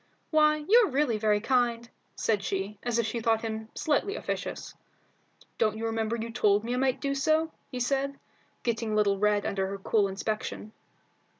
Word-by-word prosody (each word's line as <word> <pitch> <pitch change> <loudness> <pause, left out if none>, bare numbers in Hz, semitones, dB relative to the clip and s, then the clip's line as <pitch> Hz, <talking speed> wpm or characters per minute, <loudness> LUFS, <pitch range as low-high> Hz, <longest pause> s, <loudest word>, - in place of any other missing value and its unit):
"Why, 305 -1 +3
you're 455 -1 +6
really 265 -5 +1
very 210 -1 +2
kind," 235 0 +1 0.3
said 215 -3 0
she, 195 +1 -3
as 240 -1 -1
if 235 - +1
she 225 +2 -2
thought 225 -1 +1
him 220 0 -4
slightly 315 +7 0
officious. - - -4 0.9
"Don't 215 -1 +2
you 225 - -3
remember 225 0 -1
you 230 0 -4
told 210 -3 +3
me 240 +2 -2
I - - 0
might 260 0 +1
do 275 0 -1
so?" 310 +3 +1 0.2
he 255 - -5
said, 275 +2 0 0.5
getting 230 -2 -1
a - - +1
little 200 -2 +2
red 210 0 +2
under 195 -1 -1
her 195 +1 -4
cool 200 +1 +2
inspection. 215 +2 -4
230 Hz, 180 wpm, -28 LUFS, 215-270 Hz, 0.9 s, you're